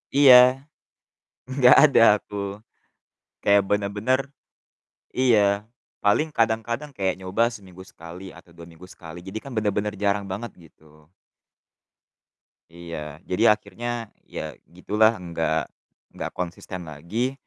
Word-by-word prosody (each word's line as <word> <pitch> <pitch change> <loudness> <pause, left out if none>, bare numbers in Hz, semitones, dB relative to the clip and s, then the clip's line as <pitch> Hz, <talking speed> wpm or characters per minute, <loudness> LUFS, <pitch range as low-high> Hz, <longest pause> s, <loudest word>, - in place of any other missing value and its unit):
Iya, 130 -1 +7 0.9
enggak 130 -2 +6
ada 140 -5 +5 0.2
aku. 105 - -13 1.1
Kayak 100 0 +4
bener-bener 105 +5 0 1.0
iya, 125 -4 +4 0.6
paling 105 +10 +2
kadang-kadang 115 +5 -1
kayak 95 -2 -1
nyoba 95 +4 -1
seminggu 95 -5 -12
sekali 85 +4 -11
atau 85 - -18
2 85 0 -13
minggu 85 +2 -14
sekali, 80 0 -11
jadi 95 +3 -6
kan 140 - -9
bener-bener 105 -1 -1
jarang 100 0 +1
banget, 115 +5 -5 0.2
gitu. 75 0 -24 1.6
Iya, 85 -3 -8
jadi 90 - -1
akhirnya 115 +3 -6 0.2
ya - - -6 0.2
gitulah 105 +5 +1
enggak 80 -3 -2 0.4
enggak - - -5
konsisten 90 0 -6
lagi 85 - -3
100 Hz, 110 wpm, -24 LUFS, 85-115 Hz, 1.6 s, Iya